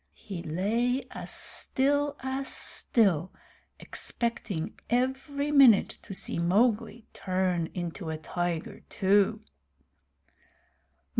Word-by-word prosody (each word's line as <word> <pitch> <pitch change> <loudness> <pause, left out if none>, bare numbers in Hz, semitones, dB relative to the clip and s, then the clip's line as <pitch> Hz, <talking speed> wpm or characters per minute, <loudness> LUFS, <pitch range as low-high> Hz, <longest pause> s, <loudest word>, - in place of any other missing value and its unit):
He 190 -5 -7
lay 225 - 0
as - - -7
still 285 +2 0
as 265 +1 -3
still, 185 -7 +2 0.5
expecting 230 -8 -3
every 265 +4 0
minute 265 -8 +7
to 195 - -8
see - - -3
Mowgli 220 +5 +1
turn 185 -3 0
into 175 -1 -4
a 160 - -3
tiger 170 +1 -3
too. 200 0 +2
210 Hz, 90 wpm, -28 LUFS, 175-260 Hz, 0.5 s, minute